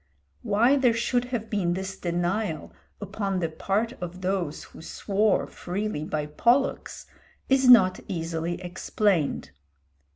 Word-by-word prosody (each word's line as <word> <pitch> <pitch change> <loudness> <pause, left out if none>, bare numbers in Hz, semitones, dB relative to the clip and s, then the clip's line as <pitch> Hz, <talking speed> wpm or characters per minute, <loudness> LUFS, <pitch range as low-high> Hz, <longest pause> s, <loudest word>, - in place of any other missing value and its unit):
Why 235 +7 +3
there 250 -4 +3
should 245 +1 0
have 240 -3 -4
been 180 -5 0
this 190 0 -4
denial 175 0 -2 0.3
upon 200 -1 -3
the 165 -2 -1
part 200 +8 -1
of 180 +1 -6
those 180 -5 -2
who - - -13
swore 200 +5 0
freely 190 -3 -4
by 155 -1 -2
Pollux 240 - 0 0.4
is 265 -1 +4
not 220 -7 +7
easily 165 -1 -3
explained. 175 - 0
195 Hz, 125 wpm, -26 LUFS, 175-220 Hz, 0.4 s, not